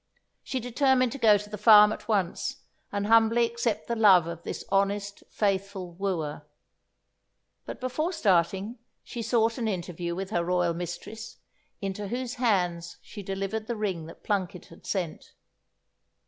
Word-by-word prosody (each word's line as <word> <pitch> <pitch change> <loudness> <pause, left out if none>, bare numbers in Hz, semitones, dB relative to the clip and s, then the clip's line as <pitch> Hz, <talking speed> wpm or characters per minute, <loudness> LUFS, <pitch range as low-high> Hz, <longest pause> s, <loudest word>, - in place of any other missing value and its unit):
She 260 - -3
determined 255 +1 +2
to 275 - -6
go 215 -4 +6
to 210 +1 -8
the 210 -1 -7
farm 210 -1 +8
at - - -10
once, 220 +6 -1 0.3
and 200 0 -2
humbly 230 +2 +5
accept 235 -1 -2
the 235 - -1
love 195 -7 +6
of 170 0 -6
this - - -6
honest, 200 +1 0
faithful 195 -2 -1
wooer; 170 -6 -3 1.2
but - - -6
before 265 +7 -1
starting 200 - +1 0.2
she 235 - -6
sought 230 0 +1
an 230 - -1
interview 175 -3 -3
with 190 +2 -5
her 175 -5 +1
royal 175 -1 +1
mistress, 175 +6 -7 0.4
into 195 +1 -4
whose 250 +3 -3
hands 180 -6 0
she 210 - -9
delivered 195 +3 -4
the 235 - -2
ring 190 -7 -3
that 165 - -13
Plunket 190 -3 -2
had 165 - -15
sent. 180 -5 -4
200 Hz, 150 wpm, -27 LUFS, 180-230 Hz, 1.2 s, farm